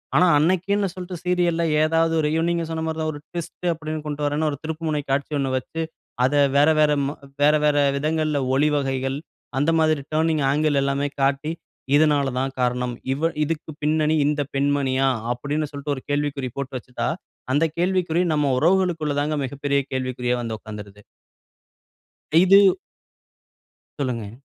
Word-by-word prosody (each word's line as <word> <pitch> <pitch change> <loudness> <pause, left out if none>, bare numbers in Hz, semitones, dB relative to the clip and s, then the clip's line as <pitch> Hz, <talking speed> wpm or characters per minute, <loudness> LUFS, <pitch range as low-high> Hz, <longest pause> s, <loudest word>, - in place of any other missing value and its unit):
ஆனா, 170 +6 +6
அன்னக்கின்னு 190 +5 +1
சொல்ட்டு 180 0 -6
சீரியல்‌ல 175 -2 +1 0.2
ஏதாவது 165 +1 +2
ஒரு 150 - +1 0.2
நீங்க 170 -1 0
சொன்னமாரிதான் 160 -1 -2
ஒரு 145 - -8
ட்விஸ்ட் 175 +1 -5
அப்பிடீன்னு 155 -1 -5
கொண்டுட்டு 150 -1 -2
வரேன்னு 150 +2 0
ஒரு 145 - -5
திருப்புமுனை 155 -1 -2
காட்சி 140 +2 0
ஒண்ணு 135 -1 -1
வச்சு, 160 +5 -5 0.4
அத 130 - +1 0.2
வேற 145 +2 +5
வேற, 150 - +4 0.2
ம் 145 - -4 0.3
வேற, 150 +1 +6
வேற 150 -1 +3 0.2
விதங்கள்ல 155 0 0 0.2
ஒளி 150 +3 +3
வகைகள், 135 -1 -1 0.4
அந்த 145 +4 +2
மாதிரி 155 -2 +2
டர்னிங் 160 -1 +1
ஆங்கிள் 150 0 +1
எல்லாமே 140 +1 0
காட்டி, 140 +3 +1 0.4
இதனால 145 -2 +4
தான் 135 +1 -2
காரணம். 125 0 0 0.2
இவ 165 +4 0
இதுக்கு 160 0 -4
பின்னணி 155 +1 +2
இந்த 150 0 +1
பெண்மணியா? 135 -1 +1 0.3
அப்பிடீன்னு 145 +4 -3
சொல்லிட்டு 145 0 -3
ஒரு 130 - -9
கேள்விக்குறி 145 -2 -1
போட்டு 140 -1 -4
வச்சிட்டா, 125 -1 -4 0.4
அந்த 150 +4 +3
கேள்விக்குறி 180 -1 +1
நம்ம 150 -2 +1
உறவுகளுக்குள்ளதாங்க 155 -4 +1
மிகப்பெரிய 140 +1 -1
கேள்விக்குறியா 125 -1 -1
வந்து 115 -2 -4
உக்காந்துருது. 105 -1 -10 1.4
இது 195 +2 +7 1.3
சொல்லுங்க. 120 -7 -3
150 Hz, 140 wpm, -23 LUFS, 135-160 Hz, 1.4 s, இது